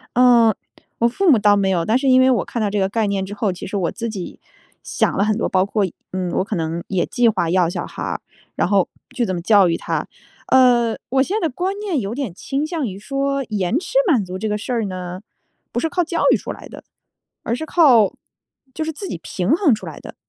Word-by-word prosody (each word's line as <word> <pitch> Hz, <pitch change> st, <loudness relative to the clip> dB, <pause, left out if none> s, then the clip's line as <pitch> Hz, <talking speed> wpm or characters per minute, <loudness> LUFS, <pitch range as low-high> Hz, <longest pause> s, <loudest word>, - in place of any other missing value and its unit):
呃， 240 Hz, -3 st, +5 dB, 0.4 s
我 235 Hz, -, +3 dB
父 365 Hz, +8 st, +2 dB
母 245 Hz, -, +6 dB
倒 205 Hz, -1 st, +4 dB
没 195 Hz, -1 st, +1 dB
有。 170 Hz, -3 st, +1 dB
但 220 Hz, +6 st, +2 dB
是 270 Hz, 0 st, 0 dB
因 255 Hz, 0 st, +6 dB
为 260 Hz, 0 st, +5 dB
我 245 Hz, -, +1 dB
看 235 Hz, -, -4 dB
到 210 Hz, -, +1 dB
这 205 Hz, -, -1 dB
个 190 Hz, 0 st, +1 dB
概 220 Hz, +1 st, 0 dB
念 195 Hz, -1 st, -1 dB
之 200 Hz, +2 st, -7 dB
后， 210 Hz, -3 st, -1 dB
其 180 Hz, -, -8 dB
实 200 Hz, -, -4 dB
我 180 Hz, -3 st, 0 dB
自 230 Hz, 0 st, -4 dB
己 195 Hz, -5 st, -7 dB, 0.4 s
想 -, -, 0 dB
了 200 Hz, -, +2 dB
很 215 Hz, 0 st, +1 dB
多 -, -, -1 dB
包 185 Hz, 0 st, +2 dB
括， 205 Hz, +1 st, 0 dB, 0.3 s
嗯， 185 Hz, -1 st, -2 dB
我 185 Hz, -, 0 dB
可 210 Hz, -, -3 dB
能 165 Hz, 0 st, -2 dB
也 185 Hz, -3 st, 0 dB
计 245 Hz, -2 st, +2 dB
划 175 Hz, -6 st, 0 dB
要 180 Hz, -2 st, +3 dB
小 175 Hz, -, -4 dB
孩 -, -, -8 dB
儿， -, -, -3 dB, 0.4 s
然 -, -, +1 dB
后 195 Hz, -2 st, +2 dB, 0.3 s
去 245 Hz, -3 st, 0 dB
怎 185 Hz, -, -2 dB
么 175 Hz, -, -3 dB
教 195 Hz, +1 st, +5 dB
育 165 Hz, -, +1 dB
他。 -, -, -3 dB, 0.4 s
呃， 245 Hz, -3 st, +4 dB
我 265 Hz, 0 st, +3 dB
现 390 Hz, +9 st, -2 dB
在 330 Hz, -, +1 dB
观 370 Hz, +8 st, -3 dB
念 380 Hz, -10 st, -1 dB
有 205 Hz, +3 st, -4 dB
点 270 Hz, -8 st, -3 dB
倾 275 Hz, +10 st, -3 dB
向 315 Hz, -6 st, -2 dB
于 190 Hz, -2 st, -6 dB
说 275 Hz, +4 st, -2 dB
延 210 Hz, -, 0 dB
迟 365 Hz, -, -7 dB, 0.2 s
满 240 Hz, -, +3 dB
足 185 Hz, +1 st, -6 dB
这 220 Hz, -, -2 dB
个 210 Hz, 0 st, -1 dB
事 250 Hz, -, -5 dB
儿 230 Hz, -2 st, 0 dB
呢， 185 Hz, -1 st, -6 dB, 0.5 s
不 240 Hz, -, -2 dB
是 325 Hz, -, 0 dB
靠 355 Hz, +2 st, 0 dB
教 335 Hz, 0 st, -2 dB
育 -, -, +5 dB
出 -, -, -6 dB
来 -, -, -12 dB
的。 -, -, -11 dB, 0.6 s
而 235 Hz, -, -1 dB
是 315 Hz, -, -5 dB
靠， 255 Hz, -, +5 dB, 0.6 s
就 315 Hz, -, -2 dB
是 320 Hz, -, -3 dB
自 380 Hz, +5 st, -7 dB
己 -, -, -5 dB
平 180 Hz, +5 st, -3 dB
衡 320 Hz, -, +4 dB
出 215 Hz, -, -8 dB
来 -, -, -8 dB
的。 -, -, -10 dB
225 Hz, 270 characters per minute, -20 LUFS, 190-265 Hz, 0.6 s, 母